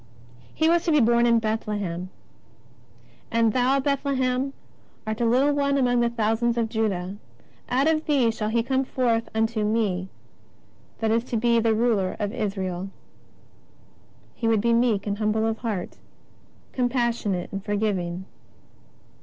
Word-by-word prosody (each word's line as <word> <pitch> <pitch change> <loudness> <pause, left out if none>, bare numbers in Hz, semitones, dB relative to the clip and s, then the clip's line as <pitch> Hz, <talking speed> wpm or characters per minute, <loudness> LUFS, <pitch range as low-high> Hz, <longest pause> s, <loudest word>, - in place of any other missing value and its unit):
* 120 +1 -24
He 320 - +2
was 340 +1 +3
to 335 - +2
be 300 - +5
born 235 0 +4
in 235 -1 +4
Bethlehem: 205 -5 -2 1.2
"And 230 -1 +2
thou, 260 +2 +2
Bethle 280 0 0
hem, 260 +1 0 0.5
art 220 +1 -3
a - - +2
little 265 +5 +3
one 280 -1 +1
among 245 -2 +2
the 235 0 +2
thousands 230 +1 0
of 230 -1 0
Juda; 200 -4 -2 0.5
out 265 +4 +2
of 320 -1 +1
thee 265 -6 +3
shall 215 -1 -3
He 230 +1 +1
come 265 +2 0
forth 235 -3 0
unto 220 0 0
Me 210 -4 0 0.9
that 220 -1 +1
is 230 +1 +2
to 240 - -2
be 235 +1 +3
the 225 -1 +2
Ruler 215 -5 +1
in 205 -1 -1
Israel." 190 -4 -3
t - - -8 1.4
He 230 - -3
would 225 -1 +3
be 235 +1 +2
meek 230 -4 +2
and 205 0 -3
humble 220 +1 +1
of 225 0 -1
Heart, 215 -7 -4 0.7
compassion 240 -5 0
ate 175 - -5
and 195 -1 -5
forgiving. 190 -4 -2
225 Hz, 160 wpm, -25 LUFS, 210-245 Hz, 1.4 s, be